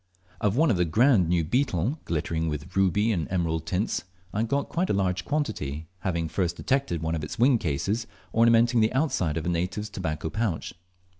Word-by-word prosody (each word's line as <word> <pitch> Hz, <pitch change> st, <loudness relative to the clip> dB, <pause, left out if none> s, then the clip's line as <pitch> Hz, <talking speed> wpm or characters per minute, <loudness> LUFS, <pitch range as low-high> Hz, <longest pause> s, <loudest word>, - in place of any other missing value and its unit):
Of 105 Hz, 0 st, +1 dB
one 155 Hz, -4 st, +4 dB, 0.2 s
grand 110 Hz, -, +4 dB
new 85 Hz, -1 st, +2 dB
beetle, 120 Hz, -, 0 dB
glittering 80 Hz, 0 st, -1 dB
with 75 Hz, +3 st, -5 dB
ruby 95 Hz, +3 st, +3 dB
and 85 Hz, -7 st, -1 dB
emerald 80 Hz, -3 st, -1 dB
tints, 90 Hz, +2 st, -1 dB, 0.3 s
I 105 Hz, -, 0 dB
got 140 Hz, +9 st, -1 dB
a -, -, +2 dB
large 90 Hz, -2 st, 0 dB
quantity, 80 Hz, -, -2 dB
having 85 Hz, -3 st, -1 dB
first 85 Hz, +1 st, -1 dB
detected 130 Hz, -, -1 dB
one 80 Hz, 0 st, -1 dB
of 80 Hz, -2 st, -2 dB
its 75 Hz, -, -5 dB
wing 125 Hz, 0 st, +4 dB
cases 100 Hz, +9 st, -1 dB, 0.3 s
ornamenting 115 Hz, +1 st, +4 dB
the 110 Hz, 0 st, +2 dB
outside 110 Hz, -, 0 dB
of 80 Hz, -, -3 dB
a -, -, 0 dB
native's 90 Hz, +5 st, -2 dB
tobacco 80 Hz, -5 st, -3 dB
pouch. 110 Hz, -7 st, -2 dB
95 Hz, 170 wpm, -26 LUFS, 80-115 Hz, 0.3 s, one